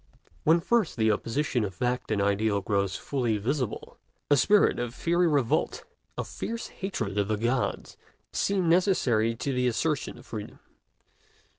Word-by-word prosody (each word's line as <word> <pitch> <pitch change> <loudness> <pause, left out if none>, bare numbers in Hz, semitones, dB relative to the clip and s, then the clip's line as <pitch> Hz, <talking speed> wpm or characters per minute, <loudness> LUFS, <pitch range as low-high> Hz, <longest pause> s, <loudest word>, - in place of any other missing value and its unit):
When 165 +2 +5
first 230 - +1
the 110 -1 +3
opposition 120 +3 -1
of 95 -3 -4
fact 125 +2 -1
and 110 -2 0
ideal 100 +1 +1
grows 100 -2 0
fully 120 -6 -1
visible, 125 +3 -3 0.3
a - - +8
spirit 200 +10 +4
of 120 0 -3
fiery 175 +1 +2
revolt, 140 -7 +1 0.3
of - - -3
fierce 230 0 -5
hatred 115 - -3
of 100 - +1
the 110 -1 0
gods, 120 +4 -1 0.4
seems 195 -3 +1
necessary 135 - +3
to 135 +4 -2
the 125 0 +1
assertion 145 +5 -1
of - - -14
freedom. 105 -2 -7
125 Hz, 150 wpm, -27 LUFS, 110-160 Hz, 0.4 s, a